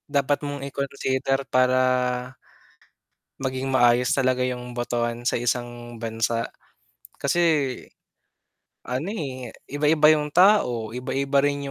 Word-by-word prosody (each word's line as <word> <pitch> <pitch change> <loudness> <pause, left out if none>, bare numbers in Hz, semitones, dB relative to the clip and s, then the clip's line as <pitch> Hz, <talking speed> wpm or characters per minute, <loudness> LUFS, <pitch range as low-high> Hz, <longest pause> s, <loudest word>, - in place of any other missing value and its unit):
dapat 140 +1 +2
mong 145 -1 -5
i-consider 135 0 -1
para 130 0 +4 1.7
Maging 130 0 -2
maayos 120 -1 +4
talaga 130 -1 +1
yung 125 -1 -5
botohan 120 0 -2
sa 120 - +1
isang 120 -1 -3
bansa. 115 0 -2 0.6
Kasi, 140 +5 0 1.4
ano, 130 +8 -3
eh, 130 - -6 0.2
iba-iba 150 +1 +4
yung 150 -1 +1
tao, 170 - +4
iba-iba 135 +3 -1
rin 140 0 0
130 Hz, 105 wpm, -24 LUFS, 120-140 Hz, 1.7 s, para